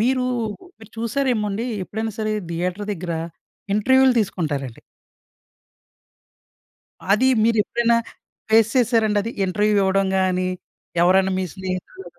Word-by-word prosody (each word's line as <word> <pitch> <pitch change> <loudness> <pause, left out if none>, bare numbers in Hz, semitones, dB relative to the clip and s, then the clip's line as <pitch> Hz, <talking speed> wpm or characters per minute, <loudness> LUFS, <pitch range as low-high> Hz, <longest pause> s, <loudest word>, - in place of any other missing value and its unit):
మీరు, 255 +2 +1 0.5
మీరు 220 -2 -15
చూసారేమోండి, 230 -2 -1 0.2
ఎప్పుడైనా 220 +3 -4
సరే 215 -1 -1 0.2
థియేటర్ 180 +4 -3
దగ్గర 175 -1 -5 0.6
ఇంటర్వ్యూ‌లు 260 +4 +4
తీసుకుంటారండి. 145 - -3 2.3
అది 235 +6 +3 0.2
మీరెప్పుడైనా 230 +1 +2 0.5
ఫేస్ 225 0 +5
చేసారాండది, 225 -3 +2
ఇంటర్వ్యూ‌ 210 +3 +1
ఇవ్వడం 195 0 +2
గాని, 185 -1 +1 0.5
ఎవరైనా 190 +2 +4
మీ 190 - 0
స్నేహితులు 190 0 -6
210 Hz, 95 wpm, -22 LUFS, 185-230 Hz, 2.3 s, ఫేస్